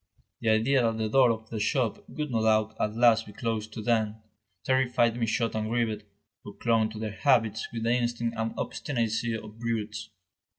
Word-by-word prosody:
The 115 - 0
idea 115 +5 +3
that 115 -1 +1
the 110 -1 -1
door 130 +1 +5
of 110 -1 -3
the 110 - -3
shop 115 +1 0
would 150 -3 -4
no 115 -2 +1
doubt 110 0 +2
at 105 0 -1
last 115 -1 +4
be 105 - -11
closed 110 -1 -3
to 110 - -6
them, 110 -2 +1 0.5
terrified 125 -2 +2
Michaud 115 0 0
and 110 0 -2
Grivet, 110 -3 -1 0.4
who 105 - -10
clung 115 -2 +2
to 110 - -9
their 110 -1 -3
habits 110 -3 +2
with 115 -1 -4
the 115 +1 +2
instinct 120 -1 -1
and 115 0 -2
obstinacy 115 -3 -2
of 110 0 -11
brutes. 115 -2 -3
115 Hz, 185 wpm, -28 LUFS, 110-120 Hz, 0.5 s, door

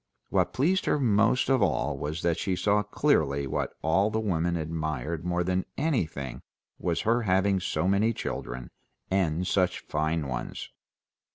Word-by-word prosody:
What - - +2
pleased 175 +8 +1
her - - +2
most 115 0 +3
of 135 -2 +3
all 95 - +1
was 75 +3 -4
that 85 -1 +1
she 95 -2 0
saw 100 +3 +2
clearly 80 - +1
what 65 - -2
all 95 +7 +3
the 110 +1 -1
women 85 -5 0
admired 80 -1 -3
more 90 0 0
than 90 +1 0
anything 85 - -1 0.4
was 85 -1 0
her 115 +2 +2
having 95 -1 +2
so 90 -1 -1
many 100 +4 +3
children, 60 - -5 0.4
and 90 -2 +1
such 90 -1 +1
fine 75 0 -1
ones. 65 -2 -5
90 Hz, 155 wpm, -28 LUFS, 80-105 Hz, 0.4 s, most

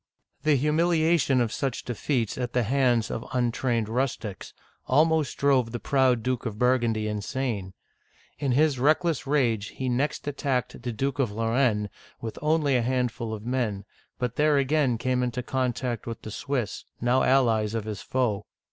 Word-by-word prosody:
The 155 -1 +3
humiliation 155 -1 +2
of 115 -2 0
such 135 -4 -2
defeats 120 -1 -1
at 125 -1 -3
the 125 - +2
hands 125 -1 +2
of 115 - -3
untrained 120 -2 0
rustics 115 -4 -3 0.4
almost 155 +1 +2
drove 130 -5 +2
the 120 - -4
proud 130 -4 +2
Duke 125 -1 -1
of 105 -2 -5
Burgundy 120 -3 +2
insane. 105 -2 -3 0.7
In 140 -3 0
his 145 -1 +3
reckless 155 +1 +2
rage 120 -8 +1
he 130 -1 -4
next 140 +4 -1
attacked 135 -4 -2
the 120 0 -3
Duke 135 +5 -2
of 125 -6 +1
Lorraine 115 -1 +1 0.3
with 115 -1 -6
only 150 -3 +2
a 125 - +3
handful 125 -2 -1
of 110 0 -6
men, 115 -6 -1 0.3
but 125 -1 -3
there 150 -1 +4
again 140 -3 +2
came 125 +2 0
into 125 0 -2
contact 125 -2 -2
with 115 -1 -6
the 110 - -7
Swiss, 125 -3 -3 0.2
now 125 +2 +2
allies 115 -5 +3
of 115 - -1
his 105 -2 -5
foe. 110 -6 -1
125 Hz, 160 wpm, -26 LUFS, 115-135 Hz, 0.7 s, there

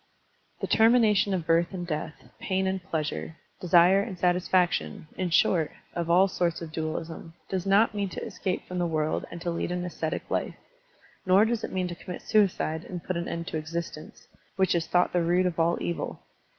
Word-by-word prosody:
The - - 0
termination 220 -3 +4
of 180 -4 -1
birth 170 +2 +2
and 175 -1 -4
death, 155 -2 -4 0.2
pain 190 0 -1
and 190 0 -1
pleasure, 160 -2 -4 0.2
desire 180 +2 +5
and 200 -3 -5
satisfaction, 175 - +1
in 185 -1 -2
short, 165 -1 +2 0.2
of 170 -1 -3
all 180 +3 +6
sorts 175 -3 -1
of 165 -2 -7
dualism, 160 +1 -5
does 190 0 -2
not 205 +3 +4
mean 200 -2 -2
to - - -6
escape 190 -4 -3
from 180 0 -4
the 175 - +1
world 155 -1 -1
and 170 - -8
to 175 - -2
lead 170 +1 -2
an 180 0 -2
ascetic 160 -2 -3
life, - - -1 0.7
nor 190 +3 +5
does 230 0 -1
it - - -4
mean 185 -1 -1
to 175 - -5
commit 175 +1 -8
suicide 190 -7 +1
and 175 -2 -7
put 185 - -3
an 170 0 -3
end 170 0 -4
to 160 - -3
existence, 155 0 -6 0.3
which 190 -1 +2
is 170 -1 0
thought 180 0 +2
the 175 - +2
root 175 +2 +2
of 175 -2 -1
all 170 +1 +2
evil. 170 - -4
175 Hz, 195 wpm, -27 LUFS, 165-190 Hz, 0.7 s, all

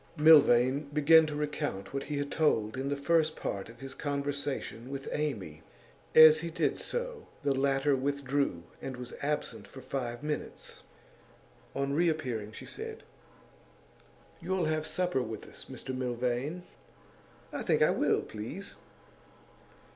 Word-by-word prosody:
Milvain 140 -2 +6
began 155 +2 +6
to 150 - -4
recount 145 -9 -3
what 140 - -3
he 150 0 -3
had 140 0 -3
told 110 -9 +1
in 135 +1 -2
the 140 - 0
first 155 +2 +2
part 100 +1 -4
of 115 0 -14
his 135 -1 -6
conversation 140 -4 -3
with 135 0 -6
Amy. 100 - -3 0.5
As 155 0 +10
he 170 +1 -4
did 165 - 0
so, 485 -2 -4 0.2
the 140 -1 +2
latter 135 +1 +2
withdrew, 140 -7 -1 0.2
and 130 -1 -5
was 125 -1 -7
absent 150 +1 -2
for 135 - -11
five 130 -1 -4
minutes; 150 0 -5 0.9
on 140 0 -1
reappearing 140 -10 0
she - - -10
said: 445 +1 -7 1.4
'You'll 185 0 0
have 155 0 0
some 180 - 0
supper 175 -7 0
with 110 -3 -6
us, - - -10
Mr 130 - -5
Milvain?' 125 +6 -2 0.9
'I - - -3
think - - +3
I - - +5
will, - - +2
please. 115 - -7
140 Hz, 140 wpm, -30 LUFS, 125-155 Hz, 1.4 s, As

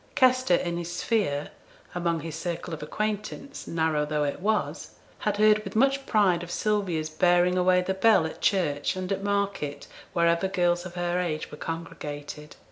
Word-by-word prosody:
Kester 255 -7 +4
in 170 0 -1
his 175 0 -4
sphere 175 -9 -1 0.4
among 170 -2 -1
his 165 0 -6
circle 170 0 -4
of 155 - -6
acquaintance, 210 - -4
narrow 160 -2 +1
though 150 0 -1
it 145 - -2
was 215 +3 -1 0.2
had 210 -1 -1
heard 215 0 +5
with - - -8
much 275 +3 +2
pride 195 -6 +3
of 175 - -7
Sylvia's 180 -6 -1
bearing 175 +2 +3
away 180 0 +3
the 190 - -1
bell 190 -3 +4
at 160 - -6
church 165 -8 +1
and 185 +1 -4
at 195 0 -1
market, 200 -8 -1 0.3
wherever 170 +2 +2
girls 175 -1 +1
of 180 - -12
her 175 0 0
age 160 -4 -3
were 150 - -8
congregated. 150 -2 -6
175 Hz, 170 wpm, -27 LUFS, 160-200 Hz, 0.4 s, heard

